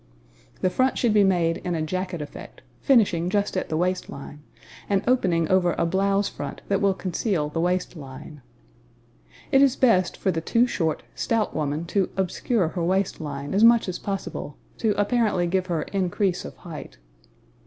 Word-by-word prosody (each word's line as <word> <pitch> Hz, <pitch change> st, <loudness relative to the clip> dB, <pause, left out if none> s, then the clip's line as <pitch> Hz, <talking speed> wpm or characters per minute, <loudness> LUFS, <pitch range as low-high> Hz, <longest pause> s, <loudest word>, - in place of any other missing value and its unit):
The 185 Hz, -, +2 dB
front 260 Hz, +5 st, +1 dB
should 235 Hz, -4 st, +2 dB
be 210 Hz, -1 st, +5 dB
made 175 Hz, -4 st, +2 dB
in 175 Hz, -1 st, -3 dB
a 160 Hz, -, -1 dB
jacket 185 Hz, 0 st, -3 dB
effect, 145 Hz, -, -11 dB, 0.2 s
finishing 195 Hz, -, +3 dB
just 205 Hz, 0 st, 0 dB
at 185 Hz, -, -2 dB
the 155 Hz, -, -1 dB
waist 180 Hz, +2 st, -1 dB
line 145 Hz, +1 st, -9 dB, 0.5 s
and 200 Hz, -1 st, +2 dB
opening 185 Hz, -10 st, +2 dB
over 180 Hz, -1 st, +2 dB
a -, -, +1 dB
blouse 195 Hz, +3 st, +1 dB
front -, -, -6 dB
that 195 Hz, 0 st, +1 dB
will 195 Hz, -1 st, +3 dB
conceal 185 Hz, -4 st, -1 dB
the 165 Hz, +2 st, -2 dB
waist 180 Hz, +1 st, 0 dB
line. 145 Hz, 0 st, -10 dB, 1.1 s
It 270 Hz, -, +5 dB
is 275 Hz, -2 st, +4 dB
best 185 Hz, -8 st, +3 dB
for 190 Hz, -, 0 dB
the 165 Hz, -2 st, -2 dB
too 230 Hz, +8 st, +3 dB
short, 165 Hz, -10 st, -1 dB
stout 225 Hz, -2 st, -1 dB
woman 150 Hz, +1 st, -2 dB
to 195 Hz, -3 st, +2 dB
obscure 190 Hz, 0 st, 0 dB
her 175 Hz, 0 st, -3 dB
waist 190 Hz, +1 st, 0 dB
line 145 Hz, 0 st, -5 dB
as 200 Hz, +3 st, +3 dB
much 235 Hz, -1 st, +6 dB
as 185 Hz, -, -3 dB
possible, 195 Hz, -6 st, -5 dB, 0.2 s
to 210 Hz, -3 st, +1 dB
apparently 205 Hz, -4 st, +2 dB
give 185 Hz, +1 st, 0 dB
her 165 Hz, -4 st, -1 dB
increase 190 Hz, -1 st, -1 dB
of -, -, -8 dB
height. 160 Hz, -, -9 dB
185 Hz, 175 wpm, -24 LUFS, 165-200 Hz, 1.1 s, much